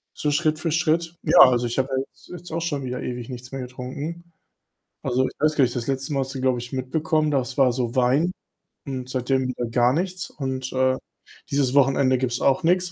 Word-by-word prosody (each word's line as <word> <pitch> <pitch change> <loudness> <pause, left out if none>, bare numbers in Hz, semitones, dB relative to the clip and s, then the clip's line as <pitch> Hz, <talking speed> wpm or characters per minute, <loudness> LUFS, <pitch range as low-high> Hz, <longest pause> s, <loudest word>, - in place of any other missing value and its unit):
so 150 - -1
Schritt 155 0 +1
für 165 0 -1
Schritt. 165 +1 +1
Ja, - - +5
also, 125 -2 +7
ich 120 - -4
habe 130 0 +1
ja 130 - +1
jetzt - - -22
jetzt 175 -1 -9
auch 165 +1 -2
schon 150 -5 -2
wieder 125 0 -4
ewig 120 -1 -5
nichts 125 0 -8
mehr 135 -1 -4
getrunken. 130 +7 -6 0.8
Also, 130 0 +1
ich - - -9
weiß 155 +1 +2
gar 140 - +4
nicht, 120 -1 0
das 120 -1 -3
letzte 135 +1 -2
Mal 135 - +1
hast 135 +1 -5
du, 130 - -4
glaube 130 -2 +2
ich, 120 +1 -7
mitbekommen, 155 +4 0
das 130 -2 -1
war 135 -3 +5
so 120 -1 -2
Wein 130 +7 +3 0.5
und 130 -2 -5
seitdem 130 0 0
wieder 125 -1 -3
gar 120 +2 +3
nichts, 185 +3 -2
und, 130 -2 -4
äh, 130 0 +2 0.5
dieses 140 -2 +1
Wochenende 135 -1 +4
gibt's 125 -1 -1
auch 135 -1 +3
nix, 180 +1 +2
130 Hz, 220 wpm, -24 LUFS, 125-155 Hz, 0.8 s, also